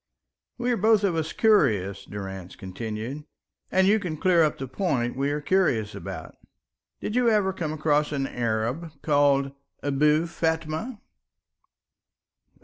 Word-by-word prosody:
"We 245 0 0
are 240 - +1
both 215 +1 +4
of 190 -4 +1
us 160 -1 -2
curious," 110 - +2
Durrance 95 -3 -7
continued, 110 +8 -6 0.5
"and 190 0 +4
you 210 +3 +4
can 175 -6 -4
clear 180 0 +4
up 155 -2 +2
the 135 - -5
point 130 -5 -1
we 135 +2 0
are 145 +1 -2
curious 145 - +1
about. 100 -5 -7 0.7
Did 215 - -4
you 245 -1 +4
ever 205 -3 +2
come 165 -5 -3
across 150 -1 +1
an 140 -2 -1
Arab 125 +6 -2
called 140 -2 +3 0.3
Abou 150 +3 +3
Fatma?" 160 +6 -2
150 Hz, 140 wpm, -26 LUFS, 120-185 Hz, 0.7 s, both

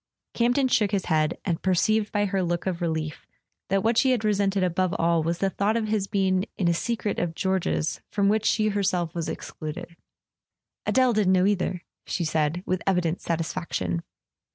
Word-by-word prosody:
Campton 245 +3 +2
shook 215 -4 +2
his 195 -2 -1
head, 155 -1 +1
and 170 -4 -1
perceived 210 +3 +2
by 205 -1 +1
her 195 -1 0
look 175 -1 -1
of 185 -2 -2
relief 160 -2 -3 0.4
that 195 0 +1
what 225 +1 +3
she 265 - +3
had 240 -4 +1
resented 200 -2 +1
above 185 +1 0
all 170 0 +2
was 165 +2 -1
the 195 +2 +1
thought 210 +4 +1
of 220 -2 -2
his 210 -2 0
being 190 -1 +1
in 180 - +1
a 170 - +4
secret 220 +3 -2
of 165 -2 -2
George's 190 -4 -1
from 200 -1 +1
which 215 +1 +2
she 215 -1 +2
herself 185 -5 0
was 170 -2 -3
excluded. 155 +2 -7 0.9
"Adele 255 -2 +3
didn't 205 -3 +3
know 185 0 +4
either," 185 -3 0 0.2
she 175 - -1
said, 155 +2 0
with 185 -1 -1
evident 180 -3 +1
satisfaction. 165 - -2
185 Hz, 180 wpm, -26 LUFS, 170-205 Hz, 0.9 s, a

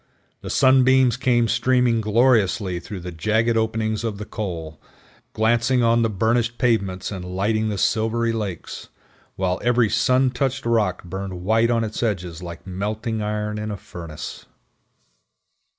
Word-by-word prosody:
The - - -7
sunbeams 130 -2 +4
came 120 -2 +2
streaming 125 -1 +2
gloriously 105 -5 +2
through 95 +1 -8
the 90 +1 -6
jagged 110 +7 +1
openings 110 0 -1
of 110 -3 -3
the 105 - -6
col, 85 -9 -6 0.5
glancing 120 +3 +2
on 115 0 +3
the 115 - +2
burnished 115 +3 0
pavements 100 -7 0
and 95 -3 -5
lighting 105 +4 -1
the 105 - -3
silvery 115 +3 +1
lakes, 100 -7 -5 0.5
while 95 -1 -1
every 120 -3 +3
sun 125 +3 +3
touched 135 +1 -2
rock 110 -6 +1
burned 95 0 -6
white 115 +4 +3
on 115 -1 +2
its 110 -1 -4
edges 90 -7 -2
like 85 -2 -8
melting 105 +4 -3
iron 105 0 -2
in 105 0 -4
a 105 - -4
furnace. 85 -4 -9
110 Hz, 145 wpm, -22 LUFS, 95-115 Hz, 0.5 s, sunbeams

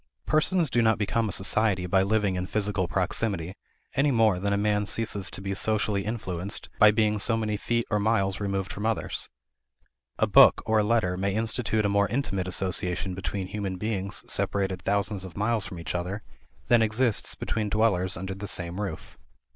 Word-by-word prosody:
Persons 155 0 +2
do 120 - +3
not 110 -1 +3
become 110 +1 0
a - - -3
society 95 -1 +1
by 95 +2 +3
living 100 0 +1
in 90 0 -3
physical 100 -3 -1
proximity, 95 -1 -2 0.4
any 140 +2 +2
more 110 -7 +3
than 100 +2 -1
a 100 - +2
man 105 0 +1
ceases 105 -3 -2
to - - -7
be 100 0 -2
socially 105 0 0
influenced 100 -3 -3
by 105 - +8
being 105 -1 +2
so 115 +3 +3
many 105 -1 -1
feet 115 +3 -1
or 105 - +2
miles 100 -2 +1
removed 100 -1 -2
from 105 - -6
others. 110 0 -2 0.9
A - - +3
book - - +6
or 110 0 +2
a - - +3
letter 105 -5 +1
may 100 +1 -1
institute 110 -1 0
a - - +4
more 100 0 +2
intimate 100 -8 -2
association 90 0 -2
between 95 +1 -4
human 100 -1 -4
beings 100 -1 -3
separated 95 -2 0
thousands 100 +1 -1
of 95 0 -10
miles 105 -1 0
from 90 -2 -8
each 85 - -5
other 90 +4 -3 0.4
than 120 -1 +5
exists 110 +1 +1
between 110 -1 -2
dwellers 100 -4 +1
under 95 +2 -5
the 100 +2 -6
same 90 +1 -2
roof. 95 -6 -6
100 Hz, 185 wpm, -26 LUFS, 95-110 Hz, 0.9 s, by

